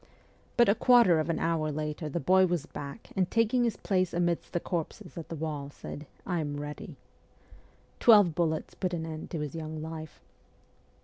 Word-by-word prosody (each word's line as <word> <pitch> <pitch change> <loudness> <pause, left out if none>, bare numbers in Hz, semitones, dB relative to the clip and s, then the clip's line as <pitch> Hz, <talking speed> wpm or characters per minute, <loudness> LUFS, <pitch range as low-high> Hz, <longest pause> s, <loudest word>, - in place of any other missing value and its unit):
But 240 - +6
a 200 - +6
quarter 230 -8 +5
of 155 - -1
an 165 - +1
hour 160 -2 0
later 150 +1 -3
the 170 - -2
boy 185 +2 +4
was 170 -4 -1
back 145 +7 -8
and, 185 -2 +1
taking 230 +2 +2
his 235 -2 0
place 185 -3 0
amidst 175 -1 0
the 175 - 0
corpses 175 +3 -4
at 165 - -7
the 165 - -4
wall, 150 -3 -4
said: 145 0 -9
' - - -30
I 175 -3 -1
am 145 -2 -3
ready.' 145 0 -7 1.0
Twelve 205 -8 +7
bullets 160 -1 -1
put 185 -2 -2
an 160 -1 -3
end 160 -1 -6
to 165 - -3
his 150 -2 -4
young 155 -1 -5
life. 155 0 -7
165 Hz, 190 wpm, -29 LUFS, 155-185 Hz, 1.0 s, Twelve